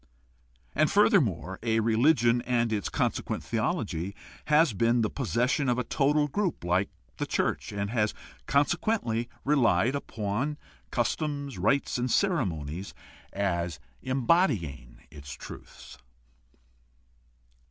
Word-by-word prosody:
And, 155 Hz, +1 st, +3 dB
further 200 Hz, -1 st, +5 dB
more, 95 Hz, -, -3 dB
a 115 Hz, -1 st, +1 dB
religion 120 Hz, +1 st, +3 dB
and 120 Hz, -2 st, 0 dB
its 105 Hz, -2 st, -1 dB
consequent -, -, -1 dB
theology 90 Hz, +5 st, -2 dB, 0.3 s
has 150 Hz, -3 st, +4 dB
been 115 Hz, +4 st, +2 dB
the 110 Hz, -, 0 dB
possession 125 Hz, -, 0 dB
of 125 Hz, -, +2 dB
a 125 Hz, -, 0 dB
total 145 Hz, +4 st, +2 dB
group 180 Hz, -, -2 dB
like 90 Hz, +3 st, +1 dB, 0.3 s
the -, -, -2 dB
church, -, -, -1 dB
and 100 Hz, 0 st, -3 dB
has 110 Hz, -3 st, 0 dB, 0.3 s
conse 145 Hz, +4 st, +3 dB
quently 120 Hz, -, -1 dB, 0.2 s
relied 125 Hz, -6 st, +3 dB
upon 125 Hz, +2 st, -2 dB, 0.3 s
customs, 140 Hz, +3 st, -2 dB
rites, 140 Hz, -2 st, +1 dB
and 125 Hz, +1 st, -1 dB
ceremonies 95 Hz, -, -1 dB, 0.4 s
as 85 Hz, -5 st, -1 dB, 0.2 s
embody 130 Hz, -, +2 dB
ing -, -, -11 dB
its 70 Hz, -2 st, -9 dB
truths. -, -, -11 dB
120 Hz, 120 wpm, -28 LUFS, 100-140 Hz, 0.4 s, further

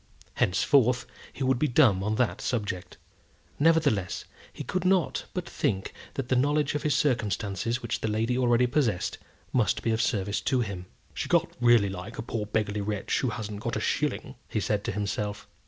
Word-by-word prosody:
Henceforth 125 Hz, +6 st, +3 dB, 0.3 s
he 135 Hz, -, -5 dB
would 130 Hz, -1 st, +2 dB
be 150 Hz, -, +2 dB
dumb 120 Hz, -8 st, +4 dB
on 105 Hz, +2 st, 0 dB
that 120 Hz, 0 st, 0 dB
subject. 105 Hz, -7 st, -3 dB, 0.6 s
Nevertheless, 145 Hz, -, +2 dB, 0.3 s
he -, -, -7 dB
could 185 Hz, -1 st, -2 dB
not 185 Hz, -2 st, +2 dB
but -, -, -3 dB
think 95 Hz, -1 st, -1 dB, 0.2 s
that 135 Hz, -3 st, -3 dB
the 130 Hz, -, +2 dB
knowledge 145 Hz, +3 st, +2 dB
of 145 Hz, -, -1 dB
his 150 Hz, -3 st, +1 dB
circumstances 115 Hz, -2 st, 0 dB
which 120 Hz, -, -2 dB
the -, -, 0 dB
lady 110 Hz, +3 st, 0 dB
already 125 Hz, -1 st, +3 dB
possessed, 120 Hz, -7 st, 0 dB, 0.3 s
must 120 Hz, -4 st, +2 dB
be 115 Hz, -, +1 dB
of 110 Hz, 0 st, +1 dB
service 100 Hz, -3 st, 0 dB
to 130 Hz, -3 st, +1 dB
him. 95 Hz, -5 st, -5 dB, 0.3 s
"She -, -, -4 dB
can't -, -, +2 dB
really 120 Hz, -4 st, +5 dB
like 95 Hz, +4 st, -7 dB
a -, -, -3 dB
poor 110 Hz, -3 st, -3 dB
beggarly 105 Hz, -1 st, -1 dB
wretch 105 Hz, 0 st, -1 dB
who 130 Hz, -, 0 dB
hasn't 105 Hz, -2 st, -5 dB
got -, -, -3 dB
a -, -, -1 dB
shilling," -, -, -1 dB
he -, -, -1 dB
said -, -, 0 dB
to -, -, -1 dB
himself. 105 Hz, 0 st, -3 dB
115 Hz, 185 wpm, -28 LUFS, 105-130 Hz, 0.6 s, really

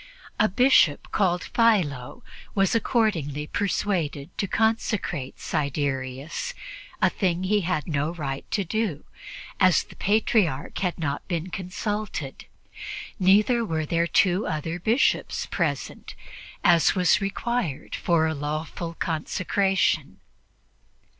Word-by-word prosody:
A 215 Hz, -, +4 dB
Bishop 225 Hz, -, +4 dB
called 180 Hz, -3 st, +1 dB
Philo 195 Hz, -, +1 dB, 0.3 s
was 195 Hz, -2 st, +3 dB
accordingly 185 Hz, -, 0 dB
persuaded 175 Hz, -5 st, -2 dB
to 200 Hz, -, 0 dB
consecrate 210 Hz, -, -1 dB
Siderius, 140 Hz, -, -2 dB, 0.5 s
a -, -, +7 dB
thing 180 Hz, -2 st, 0 dB
he 205 Hz, +2 st, +2 dB
had 170 Hz, -4 st, -1 dB
no 150 Hz, 0 st, 0 dB
right 140 Hz, -5 st, -5 dB
to 200 Hz, -, 0 dB
do, 190 Hz, -4 st, -2 dB, 0.5 s
as 185 Hz, -3 st, +5 dB
the -, -, -16 dB
Patriarch 200 Hz, -, +1 dB
had 180 Hz, -3 st, -1 dB
not 145 Hz, -3 st, -3 dB
been 175 Hz, 0 st, -3 dB
consulted; 190 Hz, -5 st, -4 dB, 0.7 s
neither 210 Hz, +6 st, +4 dB
were 160 Hz, -7 st, -2 dB
there 170 Hz, +2 st, +1 dB
two 185 Hz, +3 st, +2 dB
other 160 Hz, +3 st, -3 dB
Bishops 225 Hz, +9 st, +1 dB
present, -, -, -3 dB, 0.5 s
as 170 Hz, +1 st, +5 dB
was 180 Hz, +1 st, +3 dB
required 200 Hz, -, -2 dB
for 170 Hz, -2 st, +2 dB
a 160 Hz, -, 0 dB
lawful 155 Hz, +3 st, -4 dB
consecration. 185 Hz, +5 st, 0 dB
175 Hz, 110 wpm, -25 LUFS, 150-205 Hz, 0.7 s, a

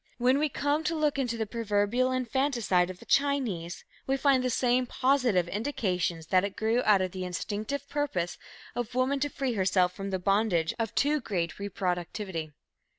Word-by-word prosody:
When 255 Hz, +3 st, +3 dB
we 305 Hz, 0 st, +1 dB
come 290 Hz, +3 st, 0 dB
to 330 Hz, -, 0 dB
look 300 Hz, -3 st, +1 dB
into 240 Hz, -3 st, -1 dB
the 220 Hz, -, -1 dB
proverbial 225 Hz, +3 st, 0 dB
infanticide 245 Hz, -7 st, +1 dB
of 185 Hz, -, -7 dB
the -, -, -15 dB
Chinese, 245 Hz, -12 st, 0 dB, 0.2 s
we 270 Hz, 0 st, +1 dB
find 270 Hz, -2 st, +3 dB
the 255 Hz, -, +1 dB
same 250 Hz, +1 st, +2 dB
positive 250 Hz, -10 st, +2 dB
indications 180 Hz, -, -1 dB
that 185 Hz, 0 st, +5 dB
it 200 Hz, -1 st, -3 dB
grew 225 Hz, +3 st, +1 dB
out 205 Hz, -3 st, +5 dB
of 185 Hz, -, -3 dB
the 185 Hz, 0 st, -5 dB
instinctive 210 Hz, +9 st, -4 dB
purpose 275 Hz, -13 st, -2 dB, 0.3 s
of 245 Hz, 0 st, -4 dB
woman 260 Hz, +2 st, +1 dB
to 290 Hz, +2 st, 0 dB
free 270 Hz, -3 st, -2 dB
herself 185 Hz, -3 st, +2 dB
from 195 Hz, 0 st, -5 dB
the 190 Hz, -, -1 dB
bondage 185 Hz, -3 st, +1 dB
of 225 Hz, 0 st, -2 dB
too 300 Hz, +2 st, +2 dB
great 175 Hz, -7 st, -2 dB
reproductivity. 180 Hz, -3 st, -3 dB
225 Hz, 175 wpm, -29 LUFS, 185-265 Hz, 0.3 s, that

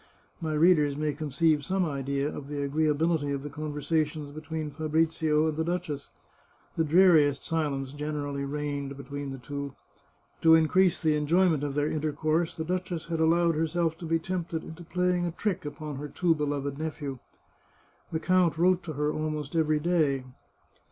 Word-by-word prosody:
My 160 Hz, -1 st, -2 dB
readers 150 Hz, -3 st, +4 dB
may 150 Hz, -1 st, 0 dB
conceive 150 Hz, +1 st, +1 dB
some 190 Hz, +4 st, 0 dB
idea 140 Hz, -1 st, -1 dB
of 145 Hz, -2 st, -6 dB
the 145 Hz, -1 st, -3 dB
agreeability 155 Hz, +1 st, +1 dB
of 140 Hz, -1 st, -3 dB
the 145 Hz, -, -6 dB
conversations 150 Hz, 0 st, -2 dB
between 155 Hz, 0 st, -5 dB
Fabrizio 155 Hz, 0 st, +1 dB
and 155 Hz, -, -1 dB
the 160 Hz, -, 0 dB
duchess. 165 Hz, -4 st, -3 dB, 0.7 s
The 165 Hz, -, +2 dB
dreariest 160 Hz, -3 st, +5 dB
silence 145 Hz, -4 st, -1 dB
generally 145 Hz, -1 st, -3 dB
reigned 140 Hz, -1 st, -3 dB
between 140 Hz, 0 st, -6 dB
the 135 Hz, -, -6 dB
two. 140 Hz, +1 st, -6 dB, 0.7 s
To 160 Hz, 0 st, +7 dB
in 160 Hz, -1 st, +4 dB
crease 185 Hz, +2 st, +3 dB
the 155 Hz, -3 st, +2 dB
enjoyment 160 Hz, +1 st, +2 dB
of 140 Hz, -1 st, -2 dB
their 145 Hz, 0 st, +1 dB
intercourse 155 Hz, +2 st, 0 dB
the 160 Hz, -, -3 dB
duchess 180 Hz, -1 st, -3 dB
had 165 Hz, -1 st, -1 dB
allowed 165 Hz, +1 st, +3 dB
herself 165 Hz, +1 st, 0 dB
to 170 Hz, -, -6 dB
be 165 Hz, 0 st, +2 dB
tempted 170 Hz, -1 st, -3 dB
into 160 Hz, +2 st, -9 dB
playing 180 Hz, 0 st, 0 dB
a -, -, -2 dB
trick 190 Hz, -2 st, -2 dB
upon 145 Hz, -1 st, -6 dB
her 145 Hz, +2 st, -5 dB
too 170 Hz, +3 st, +2 dB
beloved 145 Hz, -2 st, -2 dB
nephew. 145 Hz, -4 st, -4 dB, 0.9 s
The 160 Hz, -, -1 dB
count 180 Hz, -2 st, +2 dB
wrote 180 Hz, +2 st, +3 dB
to 160 Hz, -, -4 dB
her 150 Hz, +1 st, 0 dB
almost 155 Hz, -1 st, -3 dB
every 155 Hz, -2 st, +2 dB
day. 150 Hz, -5 st, +1 dB
155 Hz, 165 wpm, -28 LUFS, 145-165 Hz, 0.9 s, To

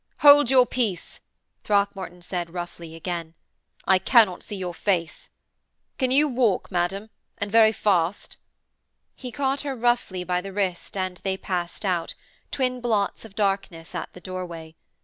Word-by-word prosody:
'Hold 290 Hz, -3 st, +8 dB
your 260 Hz, -2 st, +6 dB
peace,' 220 Hz, -9 st, -2 dB, 0.4 s
Throckmorton 195 Hz, -4 st, -1 dB
said 175 Hz, -1 st, -4 dB
roughly, 170 Hz, -2 st, -7 dB
again, 165 Hz, -1 st, -5 dB, 0.5 s
'I 190 Hz, -1 st, +5 dB
cannot 210 Hz, -5 st, +4 dB
see 210 Hz, -, -6 dB
your 180 Hz, -2 st, -4 dB
face. 170 Hz, -3 st, -2 dB, 0.7 s
Can 260 Hz, -2 st, +2 dB
you 285 Hz, +4 st, +4 dB
walk, 240 Hz, -9 st, +1 dB
madam, 195 Hz, +4 st, -1 dB, 0.3 s
and 200 Hz, 0 st, -4 dB
very 220 Hz, 0 st, +6 dB
fast?' 195 Hz, -4 st, 0 dB, 0.8 s
He 250 Hz, -2 st, -8 dB
caught 275 Hz, +2 st, 0 dB
her 280 Hz, -2 st, -3 dB
roughly 240 Hz, -6 st, 0 dB
by 180 Hz, 0 st, -1 dB
the 195 Hz, +1 st, -8 dB
wrist 190 Hz, -2 st, -2 dB
and 185 Hz, -1 st, -2 dB
they 190 Hz, 0 st, -2 dB
passed 180 Hz, +1 st, -4 dB
out, 180 Hz, -3 st, -1 dB, 0.3 s
twin 255 Hz, -2 st, -1 dB
blots 220 Hz, -3 st, 0 dB
of 205 Hz, -3 st, -14 dB
darkness, 195 Hz, -5 st, -2 dB
at -, -, -5 dB
the 180 Hz, -, -12 dB
doorway. 175 Hz, -4 st, -7 dB
195 Hz, 150 wpm, -25 LUFS, 175-230 Hz, 0.8 s, Hold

